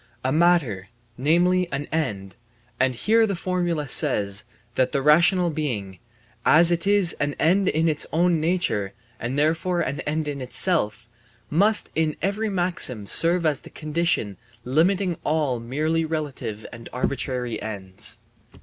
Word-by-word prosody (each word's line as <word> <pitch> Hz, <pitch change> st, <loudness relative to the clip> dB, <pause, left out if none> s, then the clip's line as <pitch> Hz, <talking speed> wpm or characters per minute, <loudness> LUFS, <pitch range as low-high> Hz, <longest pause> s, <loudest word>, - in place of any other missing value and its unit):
A 130 Hz, -, 0 dB
matter, 150 Hz, -, +1 dB, 0.3 s
namely, 175 Hz, +6 st, +1 dB
an 140 Hz, +1 st, -3 dB
end, 100 Hz, -, -3 dB, 0.4 s
and 130 Hz, 0 st, +1 dB
here 225 Hz, -, +2 dB
the 200 Hz, -, -2 dB
formula 175 Hz, -4 st, -2 dB
says 100 Hz, -4 st, +1 dB, 0.3 s
that 130 Hz, 0 st, 0 dB
the 140 Hz, -, +1 dB
rational 170 Hz, +4 st, +4 dB
being, 110 Hz, -, -4 dB, 0.4 s
as 165 Hz, +2 st, +6 dB
it 170 Hz, +3 st, -1 dB
is 200 Hz, -4 st, +5 dB
an 145 Hz, 0 st, -1 dB
end 190 Hz, +5 st, +2 dB
by 155 Hz, -, 0 dB
its 160 Hz, -2 st, 0 dB
own 170 Hz, 0 st, +2 dB
nature 155 Hz, -, -1 dB, 0.3 s
and 125 Hz, +4 st, -4 dB
therefore 165 Hz, +4 st, +1 dB
an 140 Hz, +2 st, -3 dB
end 155 Hz, +2 st, -3 dB
in 140 Hz, -2 st, -4 dB
itself, 125 Hz, -, +1 dB, 0.4 s
must 205 Hz, +7 st, +2 dB
in 155 Hz, -1 st, -1 dB
every 200 Hz, +5 st, -1 dB
maxim 175 Hz, -, +1 dB
serve 170 Hz, -, +3 dB
as 150 Hz, -2 st, 0 dB
the -, -, -13 dB
condition 155 Hz, -, -2 dB, 0.3 s
limiting 175 Hz, +7 st, +1 dB
all 150 Hz, -5 st, 0 dB
merely 155 Hz, +7 st, -1 dB
relative 140 Hz, -9 st, -5 dB
and 115 Hz, -1 st, -10 dB
arbitrary 125 Hz, -3 st, -3 dB
ends. 95 Hz, -3 st, -7 dB
155 Hz, 140 wpm, -23 LUFS, 125-175 Hz, 0.4 s, as